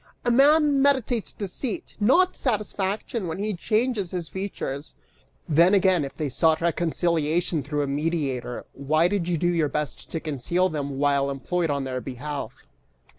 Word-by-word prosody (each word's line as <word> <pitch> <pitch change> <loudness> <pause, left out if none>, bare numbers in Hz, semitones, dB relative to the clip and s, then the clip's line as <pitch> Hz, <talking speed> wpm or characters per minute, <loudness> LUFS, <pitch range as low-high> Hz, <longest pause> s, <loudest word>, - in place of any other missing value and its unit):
A 240 - +3
man 290 +2 +5
meditates 260 -5 +1
deceit, 240 - -5
not 345 - +4
satisfaction, 210 -2 -2
when 160 - -4
he 210 +2 -2
changes 215 +1 0
his 175 -4 -4
features! 155 -6 -5 0.5
Then 170 +5 +5
again, 185 -4 +3
if 135 - -7
they 155 - -1
sought 160 +4 +2
reconciliation 170 -1 0
through 145 +1 -2
a - - -2
mediator, 140 -4 -2
why 155 +5 +2
did 185 -2 -1
you 170 - +1
do 175 +3 +1
your 160 -4 +1
best 150 -1 -4
to 165 - -3
conceal 160 +5 0
them 140 -4 -4
while 140 -1 +2
employed 165 +5 -1
in 140 -1 0
their 130 -1 -3
behalf? 140 +3 -6
170 Hz, 155 wpm, -25 LUFS, 145-205 Hz, 0.5 s, man